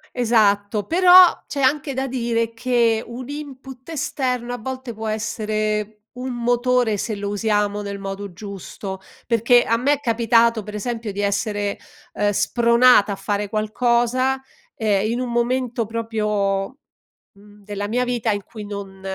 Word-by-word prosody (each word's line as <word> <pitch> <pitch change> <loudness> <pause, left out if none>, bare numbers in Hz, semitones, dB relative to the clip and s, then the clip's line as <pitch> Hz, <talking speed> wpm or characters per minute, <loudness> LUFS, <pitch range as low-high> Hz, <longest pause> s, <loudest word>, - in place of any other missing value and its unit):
Esatto. 210 -3 +2
Però, 360 - +6
c'è 280 - -3
anche 275 +1 +1
da 265 +1 -2
dire 235 -2 -1
che 230 -1 +1
un 240 +2 -8
input 270 -2 -9
esterno 250 -5 -2
a - - -3
volte 260 +1 -6
può 220 0 -6
essere 215 -1 -2
un 255 0 -4
motore, 245 -1 +1
se 215 +2 -3
lo 200 0 -4
usiamo 205 0 0
nel 200 -1 -5
modo 195 0 -6
giusto, 195 0 -7 0.3
perché 235 +1 +4
a 230 - +1
me 270 +5 +2
è 290 - -2
capitato, 230 -3 +2
pre 210 +1 -6
esempio, 230 0 -4
di 200 +1 -4
essere, 205 0 -1 0.4
uhm, 205 0 +1
spronata 235 0 +4
a - - -2
fare 200 +1 -2
qualcosa, 240 +4 +1 0.3
ehm, 215 -1 +1
in 240 - -1
un 250 -1 -3
momento 240 0 0
proprio, 210 -1 -2 0.6
mhmm, 205 +1 -19
della 205 0 -4
mia 245 +4 0
vita 245 -2 -1
in 205 -1 -2
cui 215 0 -9
non 200 -2 -8
225 Hz, 150 wpm, -21 LUFS, 205-245 Hz, 0.6 s, Però